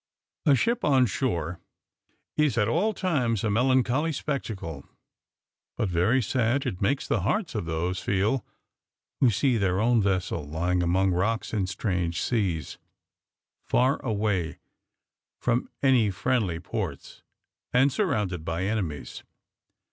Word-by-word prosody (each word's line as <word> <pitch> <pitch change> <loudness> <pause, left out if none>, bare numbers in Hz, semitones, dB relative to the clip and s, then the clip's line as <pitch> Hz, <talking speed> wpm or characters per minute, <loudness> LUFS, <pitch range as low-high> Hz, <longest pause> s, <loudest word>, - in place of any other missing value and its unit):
A 140 - +7
ship 235 - 0
on 135 -3 +4
shore 90 - -2 0.8
is, 150 -6 +2
at 105 -2 +3
all 175 - +2
times, 140 - 0
a 110 - +1
melancholy 130 +6 +2
spectacle; 110 - -4 0.9
but 105 - 0
very 90 +9 +2
sad 125 +4 +1
it 90 - -3
makes 135 +8 0
the - - +1
hearts 210 -8 0
of 105 -6 -2
those 85 +3 -2
feel 105 +6 0 0.8
who 130 - +5
see 120 +3 +2
their 95 -2 +1
own 115 +1 +3
vessel 95 -4 0
lying 90 +4 0
among 95 +2 +2
rocks 105 +7 -1
in 100 -4 0
strange 90 -3 -1
seas, 90 - -1 0.8
far 130 +3 +1
away 105 - -1 0.8
from 125 0 0
any 125 -6 +4
friendly 100 -3 0
ports, 85 - -5 0.5
and 130 +2 +4
surrounded 105 - -1
by 85 +2 -2
enemies. 95 -9 -3
110 Hz, 125 wpm, -27 LUFS, 90-130 Hz, 0.9 s, A